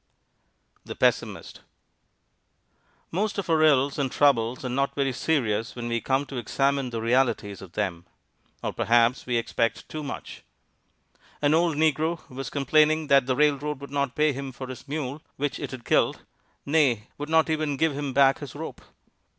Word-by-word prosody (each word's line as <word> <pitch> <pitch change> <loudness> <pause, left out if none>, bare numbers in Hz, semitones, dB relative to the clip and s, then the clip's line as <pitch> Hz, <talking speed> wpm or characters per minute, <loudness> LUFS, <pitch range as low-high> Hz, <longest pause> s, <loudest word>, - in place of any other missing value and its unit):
THE - - -7
PESSIMIST - - 0 1.5
Most 205 +5 -1
of 200 - -3
our 160 -1 +3
ills 140 -2 +3
and 135 -3 0
troubles 125 -3 +2
are - - -2
not 135 +3 -1
very 135 -2 0
serious 115 -7 0
when 120 -1 -5
we 115 -1 -1
come 135 +1 0
to 135 - -7
examine 135 +3 0
the 115 -1 -4
realities 115 -4 +1
of 95 -3 -12
them. 85 -5 -3 0.6
Or - - -2
perhaps 120 +2 +2
we 120 -1 +1
expect 115 0 -1
too 155 - -5
much. 140 -2 -7 1.0
An 145 0 +2
old 165 -2 +2
negro 160 +2 +1
was 130 -1 -5
complaining 155 +2 +2
that 135 -2 +5
the 130 - +1
railroad 150 0 +1
would 140 -1 -10
not 140 -2 -1
pay 150 -1 +3
him 135 0 -5
for 130 +1 -7
his 130 +2 -9
mule, 145 0 -4
which 145 0 -2
it - - -4
had 130 -3 -9
killed - - +2 0.4
nay, 140 -7 +2
would 145 +1 -5
not 160 0 +4
even 155 -3 -1
give 160 0 +2
him 145 -1 -3
back 135 0 +4
his 145 -2 -8
rope. 160 +2 -7
140 Hz, 170 wpm, -26 LUFS, 125-150 Hz, 1.5 s, that